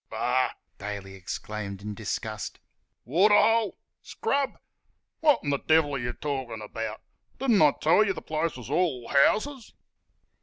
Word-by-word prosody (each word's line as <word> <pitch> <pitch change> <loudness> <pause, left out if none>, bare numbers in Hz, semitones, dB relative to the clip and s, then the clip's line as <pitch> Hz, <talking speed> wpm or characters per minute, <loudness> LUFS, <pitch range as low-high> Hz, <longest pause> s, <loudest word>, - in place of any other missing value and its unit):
"Bah!" 125 +2 +1 0.3
Daly 100 -1 -6
exclaimed 100 +1 -6
in 105 0 -4
disgust - - -4 0.5
"waterhole!... 205 - +4 0.2
scrub!... 280 - -1 0.6
Wot'n 290 - +3
th' 140 - -2
devil 155 -2 +4
're 135 - -1
y' 120 0 -2
talkin' 130 -6 -3
about? 110 +1 -5 0.4
Don't 240 -7 +3
I 150 -2 +7
tell 170 +7 +5
y' 205 - +1
th' - - -7
place 155 -1 -1
is 125 +1 -9
all 145 -8 0
houses!" 220 - +2
145 Hz, 130 wpm, -27 LUFS, -, 0.6 s, I